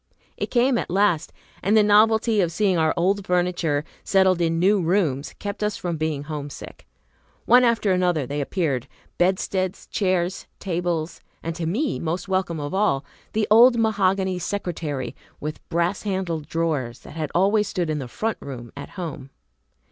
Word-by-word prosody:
It - - -3
came 245 0 +3
at - - -4
last; 190 -3 +2 0.3
and 205 +4 +3
the 215 - +6
novelty 215 +1 +4
of 170 -2 +1
seeing 190 +2 +2
our 160 -1 +3
old 195 +4 +1
furniture 175 -5 0 0.2
settled 190 -2 +3
in 165 -1 +1
new 195 +3 +3
rooms 165 -6 0
kept 205 +1 -5
us 210 0 0
from 170 -2 -3
being 155 -2 -2
homesick. 145 -2 -8 0.6
One 250 +1 +6
after 230 -4 +2
another 180 -5 +1
they 145 +2 -3
appeared, 140 - -1 0.3
bedsteads, 185 +1 0
chairs, 185 -2 -1
tables, 175 -3 -2 0.2
and, 165 0 -3
to 165 -1 -3
me 260 - -1
most 170 +3 -3
welcome 185 -4 -1
of 145 +2 -4
all, 190 -9 +1 0.3
the 215 -1 +1
old 240 +2 +7
mahogany 195 -4 +1
secretary 160 -9 -3 0.2
with 150 +1 -6
brass 170 +3 0
handled 185 -7 -2
drawers, 150 -8 -2
that - - -12
had 155 -2 -3
always 205 +4 +3
stood 175 -5 -1
in 150 - -1
the 130 - -5
"front 220 - -3
room" 120 -4 -8
at 140 - -8
home. 160 -6 -6
180 Hz, 165 wpm, -23 LUFS, 155-200 Hz, 0.6 s, old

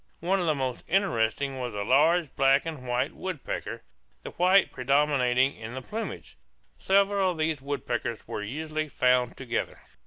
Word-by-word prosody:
One 190 +4 +1
of 175 - -1
the 155 - +2
most 130 -3 -3
interesting 140 - 0
was 125 -4 -4
a 100 - -2
large 155 +7 +3
black 135 +2 +4
and 150 -6 -6
white 125 +3 0
woodpecker, 185 -6 -5 0.4
the - - -7
white 185 +2 +4
predominating 135 -1 +2
in 115 +2 -8
the 130 - -5
plumage. 195 - -6 0.4
Several 195 0 +3
of 175 - -3
these 155 -2 -1
woodpeckers 125 -4 -3
were - - -4
usually 155 +7 -4
found 125 -2 +2
together. 130 -3 -3
140 Hz, 155 wpm, -27 LUFS, 125-170 Hz, 0.4 s, black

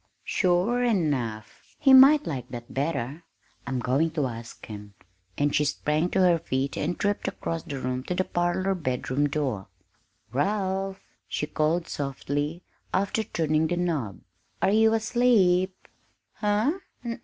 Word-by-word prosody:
"Sure 190 +7 +2
enough 140 - -2
he 270 -3 +5
might 275 +3 +8
like 130 -7 -4
that 120 -1 -8
better; 145 +1 -2 0.4
I'm 130 - -1
going 130 +7 +1
to 145 - +2
ask 115 -2 -7
him!" 105 -2 -10 0.4
and 145 0 +1
she 150 - +3
sprang 150 +3 0
to 190 - +1
her 175 -2 +4
feet 135 -3 -2
and 170 +4 -2
tripped 205 0 0
across 165 0 -3
the 140 -3 -6
room 125 0 -2
to 180 - -2
the 185 - +1
parlor 175 +2 0
bedroom 145 -3 -1
door. 135 -10 -2 0.7
"Ralph," 190 +4 -1 0.3
she - - -2
called 155 +3 0
softly, 145 +4 -3 0.3
after 200 +3 0
turning 160 -4 0
the 175 +2 -1
knob, 155 - -2 0.4
"are - - +2
you 220 +1 +4
asleep?" 210 -6 +2 0.5
"Huh? 215 - +1
165 Hz, 140 wpm, -26 LUFS, 135-190 Hz, 0.7 s, might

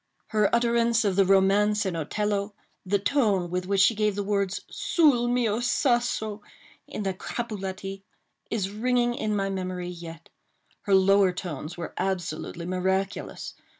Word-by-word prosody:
Her 210 -2 +2
utterance 235 -1 +2
of 195 -2 +1
the 195 0 +4
romance 200 +2 +3
in 185 -3 -2
Otello—the 200 +3 -2
tone 200 -6 +1
with 180 0 -2
which 195 0 +2
she 210 - +5
gave 210 -1 0
the 205 - -2
words 200 -1 -1
"Sul 280 -8 +2
mio 240 -3 +1
sasso," 240 -4 0 0.5
in 210 - -5
the 195 -1 -1
Capuletti—is 195 -1 -6
ringing 240 +2 +1
in 215 -3 -2
my 195 -1 -1
memory 185 -2 -4
yet. 170 -2 -9 0.6
Her 200 -3 +4
lower 195 0 +5
tones 175 -2 -6
were 175 - -6
absolutely 175 -2 -3
miraculous. 190 +2 -2
200 Hz, 135 wpm, -26 LUFS, 185-220 Hz, 0.6 s, she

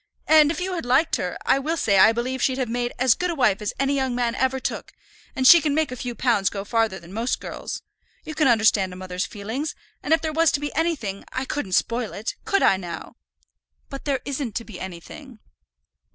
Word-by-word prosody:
And 310 -2 +6
if 310 - -2
you 370 +1 -2
had 345 - -3
liked 260 +7 +2
her, - - -3
I 270 - +3
will 315 +4 -2
say 200 -8 +3
I 220 - +8
believe 250 +3 -3
she'd 260 -1 +1
have 260 -2 -1
made 240 +1 -2
as 255 -2 +4
good 360 - -2
a 340 - -2
wife 215 -8 +2
as 210 - -2
any 275 +1 +1
young 265 -3 0
man 240 -1 0
ever 260 +1 0
took; - - -5 0.4
and 260 - -1
she 340 +5 +9
can 285 -1 0
make 310 -4 +1
a - - -4
few 245 -1 -5
pounds 225 -7 +2
go 200 -1 -6
farther 225 -3 0
than 170 +2 -14
most 230 +4 -1
girls. - - -6 0.4
You 310 - -7
can 305 -2 +2
understand 220 -5 +3
a - - -9
mother's 185 +1 -4
feelings; 225 +9 -5 0.3
and 290 - -5
if 325 - +5
there 315 -1 -3
was 325 0 +3
to - - +1
be 290 0 -4
anything, 285 - -1
I 260 +1 -3
couldn't 260 -10 -4
spoil 230 +3 0
it; 215 +3 -4
could 395 - +1
I, 190 - +5
now?" 175 -3 -8 0.8
"But 275 - -7
there 275 -3 0
isn't 275 -5 -4
to 230 - -2
be 210 -5 -10
anything." 190 - -9
255 Hz, 230 wpm, -23 LUFS, 215-290 Hz, 0.8 s, she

